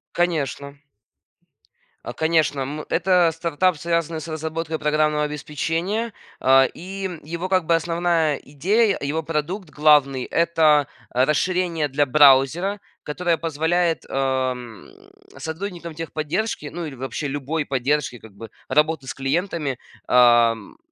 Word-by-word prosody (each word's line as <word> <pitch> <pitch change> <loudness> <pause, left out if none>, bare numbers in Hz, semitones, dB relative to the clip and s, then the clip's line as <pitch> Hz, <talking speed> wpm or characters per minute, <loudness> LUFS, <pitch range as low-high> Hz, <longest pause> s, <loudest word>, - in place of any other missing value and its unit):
Конечно. 145 -5 -1 1.3
А, - - -5
конечно, 160 -3 +1
м, 145 +3 -4
это 175 -1 +3
стартап, 170 +1 0
связанный 170 -1 -1
с - - -8
разработкой 160 0 -4
программного 150 0 +1
обеспечения, 165 +9 -2 0.3
а, 135 0 +5
и 190 +2 -6
его 170 +4 -5
как 185 -3 +2
бы 170 - +2
основная 165 -2 +1
идея, 195 +10 +1
его 155 +3 -2
продукт 165 +3 -3
главный- 145 -4 +3
это, 160 -4 +3 0.2
а, 125 +1 +2
расширение 165 +1 0
для 145 +2 +1
браузера, 145 +8 +4 0.2
которое 170 +2 -1
позволяет, 165 +2 0
ам, 130 - -2 0.5
сотрудникам 170 0 -6
техподдержки, 165 +2 -3
ну 170 0 -5
или 145 - -7
вообще 135 +3 -4
любой 145 +2 -3
поддержки, 135 -1 -1
как 110 -3 -15
бы 115 +2 -10 0.2
работы 150 0 +1
с - - -4
клиентами, 145 -1 -2 0.3
ам, 120 - +4
155 Hz, 120 wpm, -22 LUFS, 140-170 Hz, 1.3 s, а